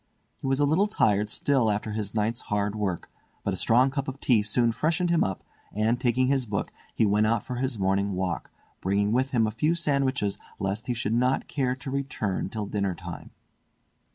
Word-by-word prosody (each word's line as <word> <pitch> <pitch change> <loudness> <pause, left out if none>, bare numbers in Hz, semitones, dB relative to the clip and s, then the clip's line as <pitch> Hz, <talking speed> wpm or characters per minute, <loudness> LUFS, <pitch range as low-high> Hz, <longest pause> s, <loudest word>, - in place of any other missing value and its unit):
He - - -4
was 135 +1 +1
a 145 - +4
little 165 +8 +3
tired 105 - +2
still 130 -1 +2
after 105 +1 -1
his 105 0 -4
night's 110 +2 0
hard 105 0 0
work, 100 -5 -2 0.4
but - - -1
a - - -1
strong 125 +4 +4
cup 140 0 -3
of 135 0 -5
tea 120 -7 +3
soon 115 +3 +2
freshened 165 +8 0
him 170 - +4
up 95 -1 -3 0.3
and, 110 +4 +1
taking 125 +1 +2
his 130 -2 +1
book, 100 -1 -2 0.2
he 110 - +3
went 105 +1 +3
out 115 -1 +1
for 125 - -5
his 130 -2 -1
morning 100 +1 +1
walk, 90 -2 -2 0.3
bringing 100 +2 +1
with 130 +3 +2
him 115 -4 +2
a 110 - -1
few 150 +10 +1
sandwiches 135 -10 0 0.2
lest 100 +5 -3
he 125 - 0
should 110 -1 -1
not 125 +3 +1
care 130 -3 0
to 135 +1 -7
return 130 -9 -2
till 105 0 -3
dinner 100 -2 -1
time. - - -8
115 Hz, 205 wpm, -27 LUFS, 105-135 Hz, 0.4 s, a